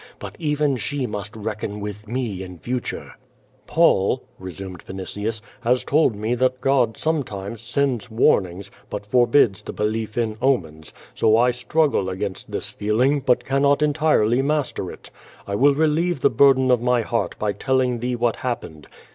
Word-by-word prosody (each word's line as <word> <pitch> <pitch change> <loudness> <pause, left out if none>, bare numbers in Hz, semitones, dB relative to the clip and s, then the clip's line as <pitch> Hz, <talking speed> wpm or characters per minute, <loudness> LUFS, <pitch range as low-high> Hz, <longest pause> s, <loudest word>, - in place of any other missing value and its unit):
But - - -8
even 150 -3 +1
she 130 +5 -2
must 105 -2 -6
reckon 105 -1 -4
with 105 +1 -7
me 115 -5 -3
in 90 -1 -8
future." 125 +7 -4 0.5
"Paul," 130 - +3 0.2
resumed 95 0 -8
Vinitius, 105 +4 -5 0.2
"has 125 +1 +1
told 145 -6 +2
me 110 +3 -1
that 130 +1 +1
God 125 -5 +2
sometimes 115 -9 -3
sends 120 0 -1
warnings, 100 -6 +1 0.2
but 105 0 -5
forbids 120 -2 +3
the - - -7
belief 110 +1 -2
in 110 -2 -1
omens, 80 - 0 0.2
so 110 0 +3
I 125 +1 +4
struggle 120 -3 +1
against 95 +1 -5
this - - -3
feeling, 125 +8 +1
but 130 -2 +1
cannot 140 +2 +2
entirely 145 -6 +2
master 140 -9 -1
it. - - -13 0.3
I 100 - -5
will 140 +7 +4
re 160 +2 +3
lieve 160 0 0
the 140 - +4
burden 130 +1 +5
of 125 -2 +3
my 125 -1 +2
heart 115 +1 -2
by 105 -1 0
telling 130 +2 0
thee 125 +1 -2
what 120 -1 0
happened. 115 - -5
120 Hz, 160 wpm, -22 LUFS, 105-135 Hz, 0.5 s, burden